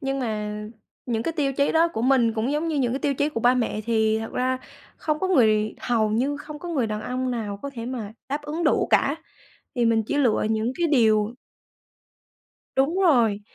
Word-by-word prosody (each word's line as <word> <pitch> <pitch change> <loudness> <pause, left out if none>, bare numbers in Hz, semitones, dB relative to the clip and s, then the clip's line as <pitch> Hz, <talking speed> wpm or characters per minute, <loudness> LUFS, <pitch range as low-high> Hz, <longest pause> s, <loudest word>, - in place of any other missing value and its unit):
Nhưng 270 -1 -2
mà 210 -2 -3 0.4
những 225 -2 -1
cái 330 - -2
tiêu 285 -4 0
chí 280 +1 +1
đó 330 +1 +4
của 225 - -3
mình 250 -3 +3
cũng 230 +5 -1
giống 305 +3 -1
như 315 - -1
những 245 -4 +1
cái 270 - -1
tiêu 280 -1 0
chí 290 +3 +1
của 230 - -4
ba 245 +2 +4
mẹ, 230 -4 -1
thì 220 -1 +2
thật 225 0 -6
ra 255 +1 0 0.4
không 305 -1 -1
có 375 - -1
người 215 - +3
hầu 225 -3 +1
như 260 +7 0
không 300 0 -9
có 350 - -7
người 280 -9 0
đàn 215 -1 -3
ông 255 +2 -2
nào 215 -4 -3
có 280 - -4
thể 230 -1 -5
mà 230 -5 -5 0.2
đáp 290 +2 -3
ứng 310 +3 -3
đủ - - +2
cả, 280 +3 +3 0.6
thì 240 -2 +2
mình 225 -1 +3
chỉ 290 - -2
lựa 245 -6 +2
những 220 +2 0
cái 340 - +2
điều 220 -6 +3 1.4
Đúng 295 +8 +2
rồi, 240 - +3
250 Hz, 215 wpm, -24 LUFS, 220-290 Hz, 1.4 s, đó